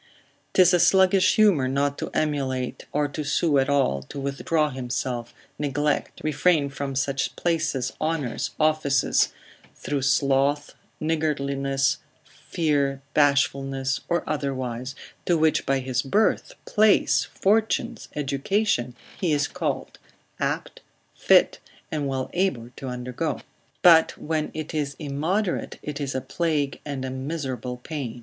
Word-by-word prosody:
'Tis 185 -1 +6
a 180 - +5
sluggish 190 +2 +5
humour 195 -12 +4
not 140 +2 0
to - - -5
emulate 130 -4 -2
or 150 0 +1
to 150 +2 -5
sue 145 0 +2
at 135 - +1
all, 135 - +2
to 70 - -8
withdraw 150 +3 0
himself, 125 -1 -3 0.3
neglect, 145 +1 -1
refrain 155 0 +2
from 135 0 -5
such 135 0 -1
places, 155 -7 -1
honours, 155 -6 -1
offices, 155 -4 +2 0.4
through 145 -1 -3
sloth, 140 +1 +2 0.3
niggardliness, 140 -3 0 0.3
fear, 140 -4 -1
bashfulness, 135 -2 +2
or 170 0 +1
otherwise, 130 -3 -3 0.3
to 175 - +3
which 160 0 +2
by 135 - +3
his 130 -1 -1
birth, 205 +11 +1
place, 215 0 +3
fortunes, 220 +3 0
education, 140 - 0 0.2
he 175 -4 +1
is 145 -1 +2
called, - - -4 0.4
apt, - - -3 0.3
fit, - - +4 0.3
and 150 -3 -1
well 130 -1 -2
able 140 -11 -1
to 135 - -7
undergo; 125 +4 -3 0.4
but 165 -2 +6
when 155 0 -2
it 155 0 -5
is 145 -3 -2
immoderate, 165 +7 -2
it 150 0 -5
is 135 -2 -3
a 130 - -1
plague 145 0 -1
and 140 -3 -4
a 130 - -4
miserable 130 -3 -4
pain. 125 -3 -6
140 Hz, 130 wpm, -25 LUFS, 135-155 Hz, 0.4 s, Tis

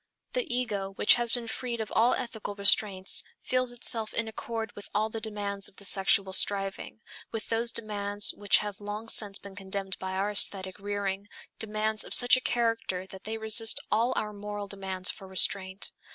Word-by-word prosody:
The - - -2
ego 210 -6 -2
which 200 - +4
has 240 -1 0
been 240 -2 -3
freed 235 +1 -4
of 220 - -5
all 235 +2 +4
ethical 225 -5 -6
restraints 200 -1 +5 0.2
feels 255 -1 0
itself 230 -2 0
in 230 - 0
accord 225 0 -5
with 205 - -11
all 215 +1 0
the 225 - -6
demands 205 -2 -3
of - - -21
the 200 - -5
sexual 195 0 +2
striving, 195 +2 0 0.3
with 225 - -6
those 230 +1 +1
demands 205 -2 0
which 205 -1 +2
have 205 0 -7
long 210 +2 -6
since 205 -3 +1
been 200 -1 -12
condemned 195 -1 -6
by 190 0 -5
our 195 +2 -1
aesthetic 190 -1 0
rearing, 200 0 -4 0.3
demands 215 0 0
of - - 0
such 245 0 +7
a 255 - -1
character 230 -7 -1
that 190 0 -12
they 220 +1 -4
resist 220 0 +6
all 230 +4 +2
our 210 0 -3
moral 205 0 -6
demands 190 -2 -1
for 195 -3 -12
restraint. 190 +1 +2
205 Hz, 180 wpm, -28 LUFS, 195-225 Hz, 0.3 s, such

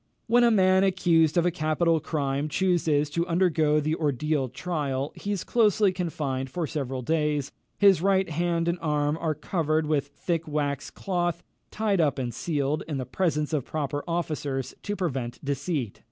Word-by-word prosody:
"When 240 +1 +4
a 240 - +6
man, 190 -3 +4
accused 175 -4 +3
of 170 - +3
a 175 - +3
capital 165 0 +1
crime, 145 -1 -2
chooses 160 -3 +1
to 170 +3 -1
undergo 165 -4 +2
the 155 +1 0
ordeal 150 -2 0
trial, 140 -1 -3
he 205 - -5
is 200 -4 -2
closely 210 -3 +3
confined 150 -7 -3
for 170 +5 -2
several 135 -4 -4
days; 150 -1 0 0.3
his 195 -5 +5
right 190 0 +2
hand 170 +1 0
and 170 +1 0
arm 150 -1 +1
are 160 -2 0
covered 155 0 0
with 150 -2 0
thick 165 +3 -3
wax 145 -2 -2
cloth, 175 -3 -2 0.3
tied 210 -4 +1
up 145 -4 +1
and 125 -3 -3
sealed, 145 +1 -1
in 150 -3 -3
the 130 - -3
presence 155 -3 -1
of 145 -4 +1
proper 145 0 -3
officers, 150 -6 -2
to 205 - -3
prevent 135 -11 -3
deceit. 140 - -2
155 Hz, 170 wpm, -26 LUFS, 145-175 Hz, 0.3 s, a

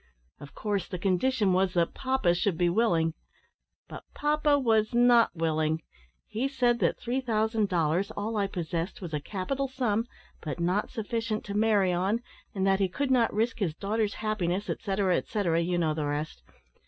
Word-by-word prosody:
Of 145 - -12
course, 205 -3 -2
the 180 - -5
condition 195 +3 +1
was 185 0 +1
that 170 -1 +1
papa 260 -9 +1
should 180 -1 0
be 175 0 +2
willing. 170 -6 +2 0.7
But - - -9
papa 295 0 +2
was 225 -4 +2
not 240 -1 +5
willing. 160 -1 0 0.4
He 225 +5 -2
said 245 -3 +1
that - - +1
three 250 +2 -2
thousand 220 -3 0
dollars, 175 +2 +1
all 220 +1 -4
I 200 -2 +1
possessed, 175 -1 -4
was 175 -5 -7
a 150 - 0
capital 215 - -3
sum, 240 -4 -1 0.3
but 155 +1 -5
not 180 +5 0
sufficient 225 -1 -3
to 200 - -5
marry 205 -3 +3
on, 195 +7 0 0.3
and 190 -1 0
that 195 0 +3
he 195 -2 +2
could 270 +9 -2
not 240 -3 +3
risk 225 +3 -1
his 170 -7 -1
daughter's 210 +3 -1
happiness, 205 -3 -1
etcetera, 195 -3 0
etcetera 175 -6 0
you 175 +1 0
know 160 -3 +1
the 150 -1 -2
rest. 145 +1 -3
205 Hz, 175 wpm, -28 LUFS, 175-230 Hz, 0.7 s, not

